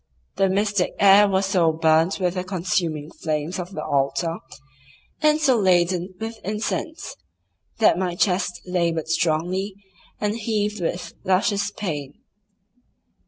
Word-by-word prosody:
The 195 -1 +3
mystic 200 -1 0
air 200 +1 +7
was 190 0 +1
so 180 -4 +3
burnt 160 +3 +2
with 180 -2 0
the 180 -1 -3
consuming 170 -4 -2
flames 155 +3 -2
of 180 +2 -6
the - - -4
altar, 145 +5 0 0.8
and 305 0 +4
so 275 -5 +3
laden 180 -1 +2
with 225 +1 -5
incense, 215 - -4 0.6
that 215 -5 +4
my 180 -2 -1
chest 180 0 0
laboured 170 -3 -1
strongly, 175 +4 0 0.4
and 210 +1 -1
heaved 210 -2 -2
with 175 +1 -3
luscious 200 +1 +1
pain. 150 -9 -5
185 Hz, 125 wpm, -23 LUFS, 165-205 Hz, 0.8 s, air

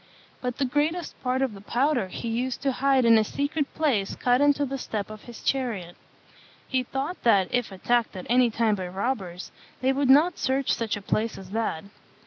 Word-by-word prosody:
But 250 -1 -3
the 280 - +1
greatest 300 +6 -1
part 255 +1 0
of 260 -5 -1
the 195 - -11
powder 245 0 +1
he 185 - -6
used 245 +4 -2
to 275 - +2
hide 265 0 +2
in 230 -1 +7
a - - +3
secret 285 +5 -2
place 245 -11 +1
cut 245 +2 +2
into 290 0 +3
the 270 0 -4
step 215 -4 -4
of 215 -1 -11
his 240 -1 -11
chariot. 220 -10 -1 0.7
He 260 -1 +1
thought 270 +7 -4
that, 200 -6 +4
if 245 -4 0
attacked 235 +4 0
at 185 - -6
any 245 +1 +4
time 225 -1 +1
by 185 -3 -3
robbers, 190 -2 -3 0.3
they 260 +1 +2
would 275 -1 0
not 310 +6 +5
search 265 0 +1
such 225 -3 -2
a 205 - -9
place 220 +2 -1
as 190 -1 -11
that. 220 -7 -2
245 Hz, 200 wpm, -26 LUFS, 215-270 Hz, 0.7 s, in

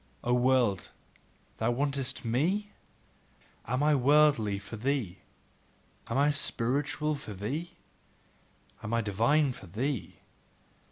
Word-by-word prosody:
O 120 - +1
world, 125 -5 +2 0.7
thou 110 - 0
wantest 135 0 -1
ME? 180 - 0 1.0
Am 125 +4 0
I 150 0 +4
worldly 140 -6 +4
for 105 - -8
thee? 110 -6 -2 0.9
Am 115 - -2
I 145 +2 +4
spiritual 145 +2 0
for 125 -8 -7
thee? 150 - -4 1.1
Am 110 +2 -2
I 115 - +2
divine 115 +8 +2
for 95 - -12
thee? 125 - -3
130 Hz, 110 wpm, -30 LUFS, 115-145 Hz, 1.1 s, I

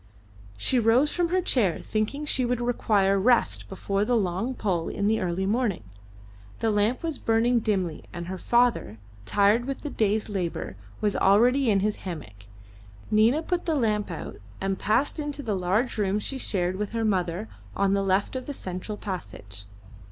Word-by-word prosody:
She 250 - +2
rose 240 +6 +4
from 350 -1 0
her 365 +1 +1
chair, 215 - +2
thinking 225 +8 -2
she 265 -3 +1
would 245 0 0
require 205 -5 +2
rest 240 +4 +2
before 195 +1 -1
the 240 +3 +2
long 200 +6 -1
pull 180 -8 -1
in 200 - -2
the 220 +1 +2
early 180 +1 -1
morning. 210 - 0 0.7
The 225 - 0
lamp 210 +6 +1
was 325 -4 -3
burning 235 +2 +2
dimly, 190 -7 -1
and 170 -1 -6
her 185 +1 -5
father, 235 - +2 0.3
tired 205 +4 +3
with 275 0 -4
the 295 - -4
day's 215 0 +1
labour, 180 - -3 0.3
was 205 -1 +1
already 240 +7 +4
in 200 -2 +3
his 210 +1 0
hammock. 105 - -8 0.7
Nina 225 +9 +4
put 355 +1 -2
the 320 - +2
lamp 215 -6 0
out 165 -3 -6 0.2
and 195 0 -2
passed 275 +9 +1
into 290 -1 -4
a 220 -4 -1
large 195 +6 0
room 200 0 +1
she 265 +6 -3
shared 185 -5 0
with 210 +2 -4
her 225 -1 0
mother 175 - 0 0.3
on 195 0 +2
the 200 - +2
left 195 +5 +1
of 255 -1 -4
the 285 - -4
central 185 +2 -5
passage. 105 - -7
210 Hz, 175 wpm, -26 LUFS, 190-245 Hz, 0.7 s, rose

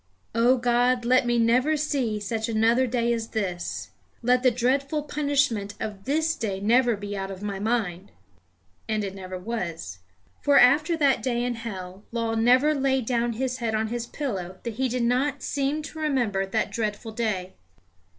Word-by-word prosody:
"O 240 +3 +4
God, 245 0 +2
let 255 0 +4
me 240 0 +2
never 250 +7 +3
see 265 -8 -1
such 220 +2 -3
another 230 +3 +3
day 235 -1 +1
as 225 -1 -3
this. 185 -6 -3 0.3
Let 250 +1 +3
the 255 - +5
dreadful 270 +5 0
punishment 285 -9 0
of 205 -3 -6
this 315 +3 +1
day 200 -4 -3
never 235 +3 +3
be 205 0 -6
out 195 0 -4
of 195 0 -8
my 200 -2 -3
mind." 205 -4 -1 0.8
And 215 -1 0
it 195 -1 -4
never 185 -1 -7
was. 175 - -5 0.4
For, 285 -1 +4
after 305 +7 +5
that 280 -4 +3
day 240 -2 0
in 245 0 -1
hell, 195 -4 -7
Law 230 -1 -1
never 250 +6 +4
laid 265 -3 +1
down 235 0 0
his 255 +2 -2
head 230 -3 -1
on 220 0 0
his 235 0 -3
pillow 190 -12 -4
that 235 - -4
he 260 0 +1
did 245 0 -1
not 265 +4 +1
seem 285 +2 -1
to 315 +1 -8
remember 240 -11 0
that 220 +3 -1
dreadful 220 0 -3
day. 215 -5 -2
235 Hz, 175 wpm, -25 LUFS, 210-260 Hz, 0.8 s, the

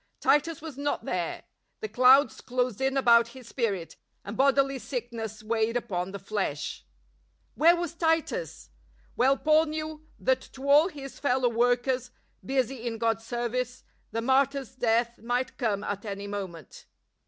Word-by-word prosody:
Titus 300 +1 +2
was 305 -4 -8
not 290 0 -2
there; - - -3 0.4
the 435 - -4
clouds 260 - +5
closed 250 -2 -1
in 270 +1 +1
about 235 -3 +5
his 250 -3 -12
spirit, 205 -10 -2 0.3
and 205 - -6
bodily 275 +1 +3
sickness 230 -4 -5
weighed 225 +1 0
upon 180 -6 -3
the 200 - -5
flesh. 195 -7 -3 0.7
Where 335 +3 +5
was 345 -2 -3
Titus? 330 +9 -1 0.4
Well 270 +3 +3
Paul 310 +2 +4
knew 310 0 -5
that 260 0 +1
to 270 +1 -7
all 295 +4 +6
his 280 -6 -9
fellow 255 -3 +2
workers, 245 +2 +1 0.3
busy 260 -2 -1
in 225 -1 -3
God's 225 0 -1
service, 250 +1 -3 0.3
the 230 +1 -3
martyr's 265 0 +1
death 235 -1 +1
might 245 +3 -2
come 210 -5 0
at 205 -1 -4
any 200 -2 -5
moment. 190 -7 -7
250 Hz, 145 wpm, -28 LUFS, 225-275 Hz, 0.7 s, all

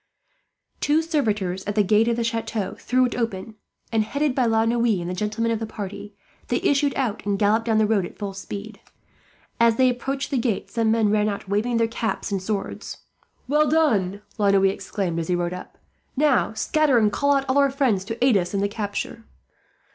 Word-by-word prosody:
Two 305 +2 +2
servitors 210 - -1
at 205 - -3
the 210 - +4
gate 215 +3 +3
of 235 - +2
the 235 - -1
chateau 225 -3 -2
threw 255 0 +2
it 245 - -2
open 225 -3 -3 0.4
and, 220 -2 +2
headed 280 +5 -1
by 255 -2 +1
La 225 0 +2
Noue 230 -3 +2
and 170 - -5
the 180 - -3
gentlemen 215 +4 -1
of 225 - -1
the 225 - -4
party, 205 -1 -7 0.3
they - - 0
issued 285 0 +2
out 245 -6 -2
and 200 0 0
galloped 215 +3 +2
down 220 -1 +2
the 215 - +4
road 210 -3 +2
at - - -8
full 200 -2 -4
speed. 205 +2 -8 0.8
As 235 -1 +5
they 255 +1 +4
approached 270 +3 -4
the 270 - +1
gate 230 -4 -2
some 225 -1 +1
men 220 -2 +2
ran 210 0 +2
out, 200 -1 -5
waving 215 +5 0
their 230 0 +2
caps 225 -2 -3
and 195 -2 -1
swords. 200 +1 -4 0.5
"Well 300 +2 +3
done!" 210 - +1 0.2
La 205 -1 +3
Noue 195 -1 +4
exclaimed, 190 -2 -1
as 165 - -3
he 180 - +1
rode 175 0 -1
up. 180 - -9 0.4
"Now, 285 -6 +2
scatter 285 +4 +2
and 215 -2 +3
call 285 +6 +2
out 275 0 0
all 260 +2 +2
our 280 0 +4
friends 260 -8 +1
to 225 +4 -1
aid 255 -4 +4
us 180 +1 -2
in - - +1
the 200 - +2
capture." 205 +1 -5
220 Hz, 210 wpm, -23 LUFS, 200-245 Hz, 0.8 s, As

